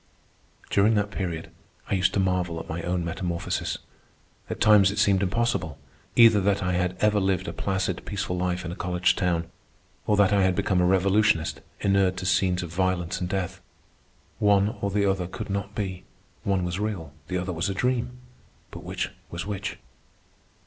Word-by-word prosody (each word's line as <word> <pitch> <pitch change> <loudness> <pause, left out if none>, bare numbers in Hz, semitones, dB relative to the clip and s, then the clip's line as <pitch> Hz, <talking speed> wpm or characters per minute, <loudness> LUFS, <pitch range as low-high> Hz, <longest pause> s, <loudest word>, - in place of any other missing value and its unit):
During 105 +3 +4
that 105 0 0
period 85 -5 -4 0.4
I - - -2
used 90 -1 +3
to - - +2
marvel 90 -3 0
at - - -8
my 80 +2 -4
own 90 0 -1
metamorphosis. 85 0 -2 0.7
At - - -4
times 105 -2 +6
it 100 - -4
seemed 100 -2 +3
impossible, 100 -6 0 0.4
either 115 -3 +7
that 100 +1 +1
I 90 0 0
had 90 0 0
ever 105 -1 +4
lived 95 -1 0
a - - -4
placid, 95 -2 -2
peaceful 95 -3 -3
life 90 0 -1
in 85 - -4
a - - -5
college 90 -1 +1
town, 85 -2 -1 0.6
or - - +3
else 100 -1 +5
that - - +4
I 100 - +4
had 95 -1 +3
become 90 0 +1
a 90 - +3
revolutionist 95 -2 +2 0.2
inured 95 -2 +2
to 95 - -4
scenes 90 -1 +2
of 85 -1 -7
violence 90 -1 0
and 90 - -2
death. 95 -2 -3 0.8
One 105 +1 +3
or 100 - 0
the 100 +1 +1
other 95 -2 0
could 95 - -6
not 100 +1 -3
be. 95 -3 -3 0.4
One 95 -2 +1
was 90 +2 -3
real, 95 -9 -3
the 90 - -2
other 90 +1 -3
was 85 +4 -1
a 95 - -2
dream, 125 +2 -1 0.5
but - - -9
which - - -3 0.2
was 85 0 -5
which? 100 -1 -4
95 Hz, 185 wpm, -26 LUFS, 90-100 Hz, 0.8 s, either